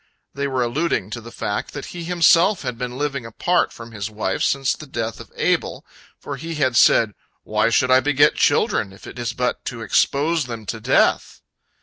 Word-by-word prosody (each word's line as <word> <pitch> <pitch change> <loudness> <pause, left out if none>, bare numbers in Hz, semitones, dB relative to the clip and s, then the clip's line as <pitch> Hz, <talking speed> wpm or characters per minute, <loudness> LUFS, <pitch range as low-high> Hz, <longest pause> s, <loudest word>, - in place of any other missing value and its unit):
They 140 +1 -2
were 130 -2 0
alluding 120 - -1
to 120 - -5
the 115 +1 -11
fact 105 - -4
that 140 - -5
he 175 -1 -6
himself 175 +2 +4
had 125 -2 -3
been 125 +1 -5
living 140 -2 -2
apart 175 +10 0
from 115 0 -11
his 105 -1 -5
wife 105 -3 -3
since 135 -1 +1
the 155 - -10
death 115 -4 -4
of - - -12
Abel, - - -1 0.3
for 140 - -7
he 165 +4 -6
had 130 -5 +1
said, 110 -3 +5 0.3
"Why 110 +1 +1
should 130 +3 +2
I 130 - +7
beget 145 +1 +3
children, 95 - +1
if 95 - -15
it - - -9
is 120 0 -2
but 125 0 -2
to 115 -2 -5
expose 145 - +1
them 115 -3 -7
to 110 +2 -4
death?" - - +1
125 Hz, 200 wpm, -21 LUFS, 115-145 Hz, 0.3 s, I